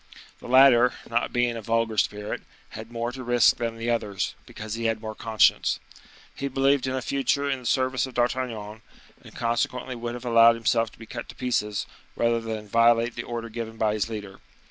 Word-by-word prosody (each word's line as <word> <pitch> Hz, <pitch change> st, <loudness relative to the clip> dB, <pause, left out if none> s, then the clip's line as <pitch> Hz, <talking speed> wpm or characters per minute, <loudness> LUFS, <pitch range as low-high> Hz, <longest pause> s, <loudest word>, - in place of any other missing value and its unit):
The -, -, -11 dB
latter, 125 Hz, -1 st, +6 dB
not 115 Hz, +1 st, -1 dB
being 120 Hz, -1 st, +1 dB
a 115 Hz, -, -5 dB
vulgar 115 Hz, 0 st, 0 dB
spirit, 105 Hz, +1 st, -1 dB, 0.3 s
had 110 Hz, +1 st, -9 dB
more 120 Hz, 0 st, -3 dB
to 130 Hz, 0 st, -8 dB
risk 120 Hz, -1 st, +4 dB
than 115 Hz, -1 st, -3 dB
the 115 Hz, +1 st, -1 dB
others, 105 Hz, -5 st, -2 dB
because 110 Hz, 0 st, -7 dB
he 115 Hz, 0 st, -3 dB
had 115 Hz, -1 st, +1 dB
more 110 Hz, 0 st, -6 dB
conscience. 110 Hz, -2 st, +2 dB, 0.5 s
He 140 Hz, -, -4 dB
believed 135 Hz, 0 st, +2 dB
in 130 Hz, -, -1 dB
a 130 Hz, -, -3 dB
future 140 Hz, +2 st, 0 dB
in 135 Hz, -2 st, -1 dB
the 125 Hz, -, -14 dB
service 130 Hz, 0 st, +1 dB
of 130 Hz, -, -12 dB
D'Artagnan, 115 Hz, -4 st, -2 dB, 0.4 s
and -, -, -15 dB
consequently 120 Hz, +2 st, -1 dB
would 120 Hz, 0 st, -5 dB
have 125 Hz, 0 st, -9 dB
allowed 115 Hz, -1 st, +6 dB
himself 115 Hz, -1 st, +1 dB
to -, -, -18 dB
be 115 Hz, -, -11 dB
cut 120 Hz, +1 st, -7 dB
to -, -, -10 dB
pieces, 105 Hz, -5 st, -1 dB, 0.3 s
rather 115 Hz, 0 st, +1 dB
than 110 Hz, -2 st, -5 dB
violate 115 Hz, +2 st, +3 dB
the 120 Hz, -, -4 dB
order 120 Hz, -1 st, -5 dB
given 115 Hz, 0 st, -6 dB
by 110 Hz, -2 st, +1 dB
his 105 Hz, 0 st, -1 dB
leader. 100 Hz, -3 st, -7 dB
115 Hz, 200 wpm, -25 LUFS, 110-125 Hz, 0.5 s, latter